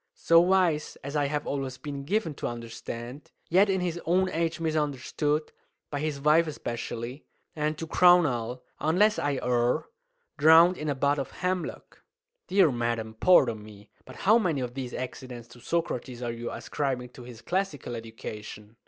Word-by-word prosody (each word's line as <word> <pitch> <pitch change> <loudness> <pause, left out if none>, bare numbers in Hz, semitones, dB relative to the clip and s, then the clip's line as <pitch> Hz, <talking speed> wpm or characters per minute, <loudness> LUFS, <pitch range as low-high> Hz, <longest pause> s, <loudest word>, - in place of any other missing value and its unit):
"So 165 0 +5
wise, 175 -4 +2
as 140 +2 -6
I 145 -1 +2
have 145 +1 -2
always 135 -2 -3
been 140 -1 -6
given 200 -1 0
to - - -4
understand, 120 +3 -7 0.2
yet 195 +4 +5
in 190 -1 +1
his 175 -1 -2
own 185 +3 +2
age 165 0 -1
misunderstood, 150 -1 -1 0.4
by 145 - -2
his 150 -1 -2
wife 155 +3 +4
especially! 120 -1 -5 0.3
And, 155 0 -1
to 165 - -4
crown 175 +1 +6
all, 125 -2 -3 0.2
unless 205 +7 +3
I 145 -2 0
err, 120 0 +1 0.5
drowned 165 +4 +7
in 150 - -3
a 145 - 0
butt 140 +2 +1
of 135 - -3
hemlock!" 180 -1 -4 0.5
"Dear 190 -6 +4
madam, 115 -2 -2
pardon 125 -12 +5
me; 105 -1 -14
but - - -12
how 220 +4 +4
many 165 - 0
of 125 -1 -4
these 130 -2 -5
accidents 125 -2 -7
to 120 - -15
Socrates 125 -5 -3
are 120 - -2
you 120 0 -5
ascribing 130 -3 -3
to 125 - -13
his 120 -2 -11
classical 175 -10 -2
education?" 110 -1 -8
145 Hz, 165 wpm, -27 LUFS, 120-165 Hz, 0.5 s, drowned